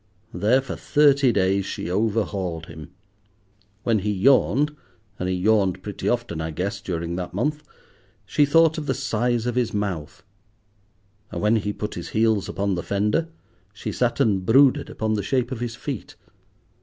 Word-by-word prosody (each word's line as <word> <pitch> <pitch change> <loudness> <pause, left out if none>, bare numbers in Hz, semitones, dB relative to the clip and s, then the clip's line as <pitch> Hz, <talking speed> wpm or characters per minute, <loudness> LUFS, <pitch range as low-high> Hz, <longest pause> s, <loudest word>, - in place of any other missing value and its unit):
There 110 +9 +3
for 135 - -6
thirty 140 -3 +4
days 95 -1 +2
she - - -5
overhauled 100 -5 -1
him. 80 -1 -10 0.9
When 115 -3 +2
he 105 +2 -1
yawned—and 135 -2 0
he 95 - 0
yawned 95 -1 +2
pretty 105 - -3
often, 120 -10 -2
I 80 - -3
guess, 95 +6 -3
during 85 -1 -3
that 90 -1 -5
month—she 150 +2 -3
thought 160 +1 +4
of 150 - -7
the - - 0
size 120 -3 0
of 125 - 0
his 125 -3 0
mouth, 95 -7 -4 1.1
and - - -4
when 105 +2 +3
he 105 -1 -2
put 105 +1 -5
his 85 - -6
heels 110 -3 +2
upon 100 0 -1
the 90 - -2
fender 105 - 0 0.4
she 100 - -5
sat 125 -1 0
and 100 -4 +2
brooded 130 +6 +4
upon 110 0 -2
the 105 - 0
shape 125 +5 -1
of 130 - -4
his 120 -1 -4
feet. 135 -3 -6
105 Hz, 160 wpm, -23 LUFS, 95-125 Hz, 1.1 s, thirty